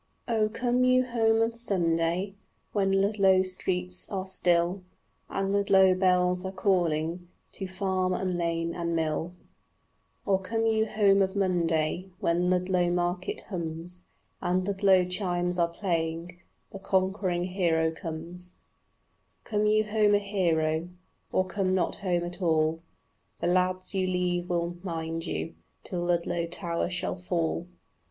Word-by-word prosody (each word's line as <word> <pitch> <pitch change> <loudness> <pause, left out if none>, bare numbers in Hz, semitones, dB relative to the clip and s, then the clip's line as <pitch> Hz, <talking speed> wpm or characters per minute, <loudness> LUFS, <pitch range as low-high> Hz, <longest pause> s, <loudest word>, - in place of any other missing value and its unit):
Oh, 220 -3 +1
come 245 +2 0
you 255 0 +4
home 225 -2 +2
of 225 0 -1
Sunday 180 -4 0 0.4
When 195 -2 +1
Ludlow 195 -1 +3
streets 185 -1 0
are 190 -2 -3
still 180 0 +1 0.5
And 195 0 -1
Ludlow 195 -2 +5
bells 180 -1 +2
are 190 - -4
calling 175 -3 0 0.2
To 190 - -6
farm 185 0 -1
and 185 0 -1
lane 170 -1 -1
and 170 -1 -2
mill, 160 +2 -1 0.9
Or 195 -2 +2
come 225 +4 -1
you 220 0 +2
home 200 -2 +3
of 190 +1 0
Monday 175 -2 0
When 175 +1 +1
Ludlow 180 -1 +1
market 175 +1 -1
hums 170 -1 -6 0.4
And 185 +1 0
Ludlow 195 -2 +4
chimes 180 -1 -1
are 170 - +4
playing 170 -1 -3 0.3
"The 195 - -8
conquering 190 -2 0
hero 170 -3 +1
comes," 170 +3 -8 0.9
Come 210 -1 0
you 215 0 +4
home 210 -1 +3
a - - +6
hero, 170 -5 0 0.4
Or 185 - +2
come 185 0 0
not 185 - 0
home 175 -3 0
at 175 +2 -6
all, 160 -1 +1 0.6
The - - -3
lads 185 +1 +1
you 190 -1 0
leave 180 -1 -1
will 175 0 -1
mind 165 -2 -4
you 165 - -3 0.3
Till 175 -2 -3
Ludlow 175 -1 0
tower 170 0 -2
shall 180 0 -2
fall. 170 -1 -2
180 Hz, 135 wpm, -28 LUFS, 170-195 Hz, 0.9 s, a